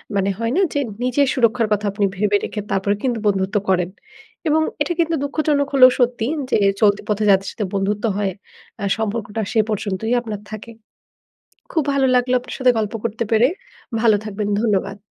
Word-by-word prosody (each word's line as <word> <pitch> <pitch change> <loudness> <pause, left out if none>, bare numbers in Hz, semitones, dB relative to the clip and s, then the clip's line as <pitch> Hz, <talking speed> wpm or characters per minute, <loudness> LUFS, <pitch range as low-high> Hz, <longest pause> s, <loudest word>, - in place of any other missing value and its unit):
মানে 195 0 +1
হয় 230 0 -1
না 380 - +3
যে 285 - +1 0.2
নিজের 255 +3 +2
সুরক্ষার 235 -3 +2
কথা 210 0 -1
আপনি 200 0 0
ভেবে 205 +1 +2
রেখে 215 - -4
তারপরে 195 +1 +1
কিন্তু 245 -3 0
বন্ধুত্ব 195 0 0
করেন। 180 -2 +2 0.6
এবং 310 +1 +3 0.2
এটা 295 +4 +1
কিন্তু 330 -1 +2
দুঃখজনক 285 0 0
হলেও 255 -2 +8
সত্যি 245 -2 +1 0.3
যে - - +4 0.2
চলতি 205 -1 +4
পথে 210 0 0
যাদের 195 0 +4
সাথে 210 - -3
বন্ধুত্ব 200 +1 -1
হয় 200 -2 0 0.5
আ - - 0
সম্পর্কটা 220 0 -3
সে 225 - +3
পর্যন্তই 210 +1 -2
আপনার 215 -4 -6
থাকে। 215 +2 -8 1.0
খুব 320 - +1
ভালো 275 -1 +2
লাগলো 250 0 +2
আপনার 245 - -8
সাথে 255 -2 +4
গল্প 215 -1 -1
করতে 230 0 -2
পেরে। 225 +2 +5 0.5
ভালো 225 -2 +5
থাকবেন। 210 -1 -4
ধন্যবাদ। 200 -3 0
220 Hz, 175 wpm, -20 LUFS, 205-250 Hz, 1.0 s, হলেও